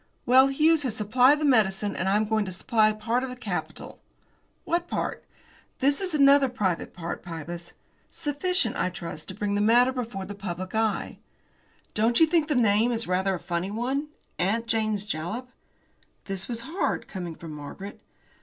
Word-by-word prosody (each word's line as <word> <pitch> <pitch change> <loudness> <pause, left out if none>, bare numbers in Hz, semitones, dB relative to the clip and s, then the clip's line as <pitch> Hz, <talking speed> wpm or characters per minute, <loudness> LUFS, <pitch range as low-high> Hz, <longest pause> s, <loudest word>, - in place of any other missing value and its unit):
Well, 260 +2 +6
Hughes 310 +3 +3
has 250 -6 -2
supplied 250 +7 +4
the 305 - 0
medicine, 205 -6 +2
and 190 - -1
I 195 - +3
am 215 +1 +2
going 215 0 +1
to 185 - -5
supply 215 +4 +2
part 225 +3 -1
of 265 - -3
the 250 - -6
capital." 250 - -5 0.6
"What 345 +1 -1
part?" - - -3 0.5
"That 280 +4 +2
is 365 -4 0
another 280 -1 +6
private 190 -9 -2
matter, 170 -1 -4
Pybus. 170 0 -8 0.4
Sufficient, 295 -3 -1
I - - +1
trust, 170 -3 -7
to 185 - -7
bring 205 0 -2
the 205 - +1
matter 240 +4 +5
before 230 -7 -4
the 205 - -7
public 185 -2 -6
eye." 220 -2 -1 0.7
"Don't 225 +2 +2
you 325 - +8
think 320 -1 +2
the 300 - 0
name 225 0 +3
is 230 -1 -1
rather 190 +1 +1
a - - -6
funny 170 +3 -3
one? 255 +7 -2 0.3
'Aunt 210 +6 +1
Jane's 215 -3 0
Jalap!'" 210 +10 -4 0.7
This 195 -1 -3
was 235 -1 -3
hard, 320 +10 -2
coming 175 -4 -6
from 165 -1 -9
Margaret. 150 +7 -8
220 Hz, 175 wpm, -26 LUFS, 190-260 Hz, 0.7 s, you